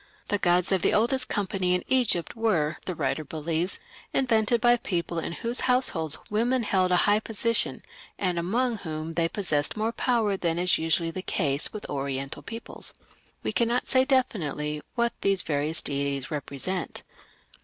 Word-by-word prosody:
The 205 - +1
gods 180 -1 +3
of 190 -2 +3
the - - +3
oldest 255 +4 +2
company 190 -3 0
in 180 - -2
Egypt 240 -10 +1
were, 185 -10 +1
the 180 - -3
writer 155 +1 -1
believes, 160 - 0 0.3
invented 235 -3 +2
by 240 +1 +5
people 170 -5 -2
in 165 - -3
whose 235 +5 -1
households 165 - +1
women 240 +4 +2
held 185 -3 +2
a - - +5
high 205 +1 +4
position, 225 +1 0 0.3
and 180 -3 0
among 230 +7 0
whom 160 -2 -5
they 165 0 +1
possessed 175 -3 0
more 220 +1 0
power 230 -5 +1
than 170 -3 -1
is 180 0 +3
usually 165 +1 +1
the 185 - -4
case 145 -6 0
with 215 - -7
Oriental 135 0 -3
peoples." 230 0 -5 0.5
We - - 0
cannot 235 +1 +1
say 260 0 +4
definitely 155 - 0
what 235 0 +1
these 195 -1 +2
various 150 +1 0
deities 140 -1 -2
represent. 150 +5 -2
185 Hz, 160 wpm, -27 LUFS, 160-230 Hz, 0.5 s, by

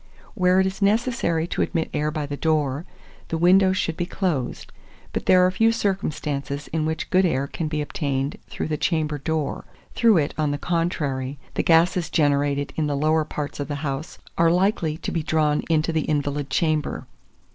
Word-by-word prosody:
Where 180 0 +3
it 190 - +4
is 190 +1 -3
necessary 200 -6 +1
to - - -1
admit 165 -3 -1
air 150 0 0
by 155 -1 -3
the 145 0 -4
door, 150 -1 0 0.4
the 165 - -2
windows 185 +2 +4
should 165 -3 -1
be 175 - -2
closed; 175 -10 -2 0.4
but - - -3
there 180 0 +6
are 185 - +3
few 225 +4 +3
circumstances 150 -9 -2
in 155 -1 -1
which 160 0 -3
good 185 +1 +4
air 140 -6 +1
can 155 +3 -4
be 150 -1 -1
obtained 140 -1 -2
through - - -4
the 155 - -1
chamber 155 -2 0
door; 160 +1 -2 0.3
through 225 -5 +4
it, 145 -3 0
on 150 -1 +2
the 145 - -1
contrary, 145 -5 -2 0.2
the - - 0
gases 170 +1 +3
generated 145 -1 +1
in 155 -2 +1
the 145 -1 -1
lower 155 +2 +2
parts 150 -1 -5
of 145 - -3
the 145 - -3
house 140 +3 -4 0.2
are 165 0 +5
likely 175 -3 +1
to - - -4
be 165 - -1
drawn 155 -1 +1
into 160 0 +2
the 155 -2 0
invalid 145 -1 -1
chamber. 155 +1 0
155 Hz, 190 wpm, -23 LUFS, 145-175 Hz, 0.4 s, there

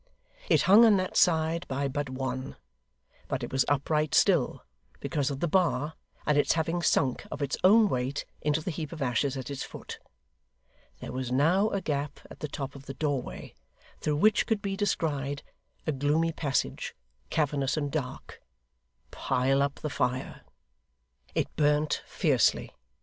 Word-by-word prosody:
It - - +4
hung 205 +5 +8
on 220 -3 +6
that 185 0 -2
side 165 0 +3
by 140 +1 -1
but 145 0 -3
one, 130 0 -4 0.7
but - - -3
it - - -5
was 135 0 +2
upright 150 +1 +1
still, - - +3 0.4
because 145 -3 -1
of 140 -1 -5
the 175 - +2
bar, 160 -4 +1 0.3
and 150 -1 +3
its - - +3
having 165 +2 -1
sunk, 135 -6 +1
of - - -6
its 140 - -1
own 215 +4 +7
weight, 130 -3 -2 0.2
into 150 +1 +1
the 180 - -3
heap 155 -2 -5
of 155 -4 -3
ashes 130 +2 0
at 130 +2 -6
its 140 - -5
foot. - - -8 1.0
There - - -6
was 130 -1 -4
now 170 +11 +3
a 200 - -2
gap 145 -3 -3
at - - -11
the 150 - -3
top 140 -1 -5
of 140 0 -13
the 135 - -6
doorway, 140 -2 -3 0.5
through 150 - 0
which 215 +7 +4
could 220 -2 +1
be 195 -1 -2
descried 145 -8 -1 0.4
a 155 - +1
gloomy 150 +4 +1
passage, 145 -4 -2 0.3
cavernous 145 -2 0
and 145 -2 -1
dark. 135 -4 -5 0.7
Pile 135 +2 +1
up 140 0 0
the 150 - -3
fire! 130 +1 -2 0.9
It - - -1
burnt 150 0 +2
fiercely. - - +2
145 Hz, 160 wpm, -28 LUFS, 135-165 Hz, 1.0 s, hung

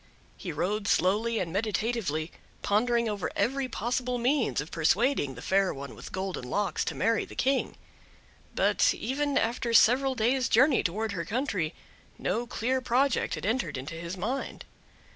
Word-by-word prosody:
He 175 - -6
rode 200 +7 -1
slowly 215 +6 +2
and 170 -5 -2
meditatively, 200 -6 -1 0.3
pondering 235 +3 +2
over 205 -3 -2
every 270 +1 0
possible 245 +2 -1
means 250 +1 +1
of 150 - -5
persuading 170 - +1
the 125 - -9
Fair 195 0 +2
One 140 -1 -7
with - - -10
Golden 190 -5 -4
Locks 205 +8 0
to - - -3
marry 225 -1 +1
the - - -11
King; 270 +1 0 0.8
but, - - +3
even 280 +4 -1
after 235 0 0
several 260 +4 +5
days 250 +2 +1
journey 260 +3 +5
towards 210 +4 -2
her 170 - -3
country, 200 - -2 0.4
no 230 +6 -1
clear 255 +2 -1
project 255 +2 +1
had - - -6
entered 225 - -1
into 135 +5 -6
his 170 +2 -6
mind. 240 +9 -4
225 Hz, 155 wpm, -28 LUFS, 185-250 Hz, 0.8 s, several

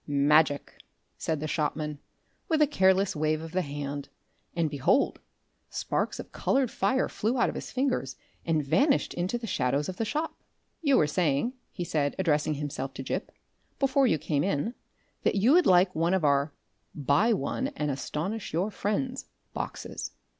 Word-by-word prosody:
"Magic!" 145 +1 +3 0.4
said 160 -2 -2
the 155 - -3
shopman, 150 -1 -2 0.5
with 320 -2 +2
a 300 - +7
careless 190 - +3
wave 155 0 +1
of 160 0 -8
the 185 +2 +1
hand, 145 -2 -5 0.5
and 170 -2 +2
behold! 145 - +2 0.5
sparks - - -2
of - - -8
coloured 265 -3 +1
fire 260 0 +1
flew 230 +5 -1
out 240 - +3
of - - -4
his - - -6
fingers 255 - -1 0.3
and 155 -3 0
vanished 275 - +2
into 180 +7 -1
the 235 - -6
shadows 140 - 0
of 185 - -5
the - - 0
shop. 305 +8 -2 0.5
"You 280 -5 +4
were - - +5
saying," 155 - +1 0.2
he 180 - -4
said, 145 -4 0
addressing 155 -4 +1
himself 140 -2 -4
to 135 - -5
Gip, - - -3 0.5
"before 275 -1 +3
you 160 - +3
came 145 -2 0
in, 190 +5 0 0.5
that - - +1
you 210 +6 +4
would 355 +1 +5
like 185 +1 +5
one 165 +3 +2
of 180 -5 +1
our 140 +1 +3 0.4
'Buy 145 - +3
One 210 - -1
and 150 -1 -1
Astonish 165 +10 -4
your 185 +6 0
Friends' 215 +7 -2 0.3
boxes?" - - -5
165 Hz, 170 wpm, -28 LUFS, 145-225 Hz, 0.5 s, a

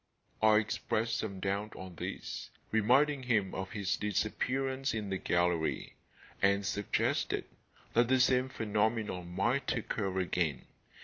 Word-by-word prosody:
I 110 0 +6
expressed 110 +1 0
some 100 -3 -4
doubt 100 +2 -2
on 95 -1 -8
this, 85 - -5 0.2
reminding 130 +6 +4
him 110 -7 +1
of 95 +2 -4
his 100 -4 -1
disappearance 130 +6 -1
in 105 -3 -3
the 95 - -1
gallery, 85 -2 0 0.5
and 100 0 +3
suggested 105 0 0 0.5
that 120 +1 +4
the 130 +1 +3
same 125 +1 +3
phenomenon 105 -5 -1
might 115 +10 0
occur 95 -3 -2
again. 85 -6 0
105 Hz, 125 wpm, -32 LUFS, 95-120 Hz, 0.5 s, I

